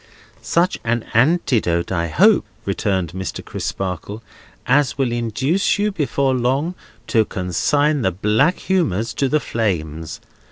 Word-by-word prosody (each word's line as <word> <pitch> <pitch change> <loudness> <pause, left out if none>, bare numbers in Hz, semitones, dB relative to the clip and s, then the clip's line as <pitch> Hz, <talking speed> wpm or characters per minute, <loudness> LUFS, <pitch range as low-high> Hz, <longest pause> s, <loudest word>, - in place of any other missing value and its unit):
"Such 175 +2 +1
an 120 0 0
antidote, 115 - +2
I 85 -2 0
hope," 80 - +4 0.2
returned 95 -5 -1
Mr. 95 +1 -5
Crisparkle, 95 +3 -4 0.4
"as 140 +1 +2
will 135 -3 0
induce 120 - 0
you 210 +1 +1
before 140 -6 0
long 130 +7 0 0.3
to 110 -1 +3
consign 145 - 0
the 95 - +2
black 105 - +2
humours 120 - 0
to 135 - 0
the 155 - +2
flames. 80 - -3
120 Hz, 125 wpm, -20 LUFS, 95-145 Hz, 0.4 s, hope